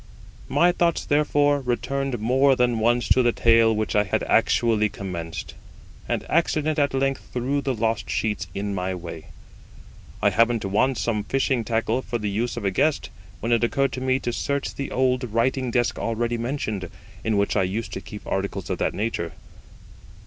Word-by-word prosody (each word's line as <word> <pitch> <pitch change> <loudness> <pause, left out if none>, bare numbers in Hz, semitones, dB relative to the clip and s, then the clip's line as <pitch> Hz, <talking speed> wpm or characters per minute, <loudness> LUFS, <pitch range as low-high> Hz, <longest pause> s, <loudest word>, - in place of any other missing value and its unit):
My 170 +6 +4
thoughts, 170 -2 0
therefore, 145 -1 +2
returned 135 +1 -2
more 130 +5 +3
than 120 -2 +1
once 120 +2 +2
to 130 - +5
the 120 -1 +3
tale 115 -1 +4
which 110 -1 -1
I 105 - +5
had 95 - -1
actually 110 -3 +2
commenced, 90 -5 -6 0.6
and - - -1
accident 155 -1 +1
at 140 -2 +1
length 135 0 -1
threw 130 +3 -1
the 135 -2 -1
lost 115 0 -1
sheets 105 -5 -1
in 100 0 -2
my 95 0 -2
way. 85 -2 -8 0.9
I - - +3
happened 115 0 +2
to 95 - -2
want 130 +6 +2
some 105 -2 -1
fishing 135 -1 0
tackle 115 +3 0
for 120 - -3
the 105 -2 -3
use 120 +4 -2
of 110 - -4
a 100 - +2
guest, 150 +10 0 0.3
when 115 - -1
it 115 0 +3
occurred 135 +3 +1
to 130 - -5
me 130 0 +2
to 120 - -2
search 140 +2 -2
the 140 - -4
old 130 0 +1
writing 125 +3 0
desk 120 0 0
already 115 +1 -1
mentioned, 115 -6 -3 0.3
in 110 -2 +1
which 100 0 +1
I 100 - +3
used 100 +5 -2
to 95 - -4
keep 105 +2 -10
articles 95 -1 -3
of - - -2
that - - 0
nature. 100 -6 -2
120 Hz, 185 wpm, -24 LUFS, 105-135 Hz, 0.9 s, to